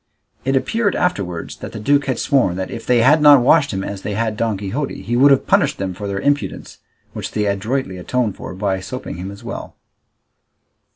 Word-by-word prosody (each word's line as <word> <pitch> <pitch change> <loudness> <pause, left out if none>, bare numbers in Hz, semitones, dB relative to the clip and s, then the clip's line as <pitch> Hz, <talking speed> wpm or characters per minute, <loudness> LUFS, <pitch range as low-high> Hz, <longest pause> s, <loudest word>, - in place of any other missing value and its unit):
It 135 +1 +1
appeared 205 - +1
afterwards 95 - -2
that - - -8
the - - -6
duke 140 +6 +2
had 130 -3 0
sworn 130 - +2
that 95 0 -4
if 115 - -7
they 125 -2 +4
had 150 +6 +5
not 145 -2 +8
washed 140 +1 +4
him 95 -1 -3
as 100 -1 -5
they 105 0 -4
had 110 0 -1
Don 110 -1 -1
Quixote 110 +9 -4
he 120 - -2
would 135 +4 +6
have 135 - +3
punished - - +2
them 95 -1 -3
for 100 +3 -6
their 100 0 -3
impudence, 145 +7 -2 0.3
which - - -6
they 105 -1 0
adroitly 100 +1 -2
atoned 115 +2 -1
for 95 - -8
by 95 -1 -1
soaping 110 +1 -6
him 90 +2 -6
as 100 0 -11
well. - - -7
115 Hz, 210 wpm, -19 LUFS, 95-135 Hz, 0.3 s, not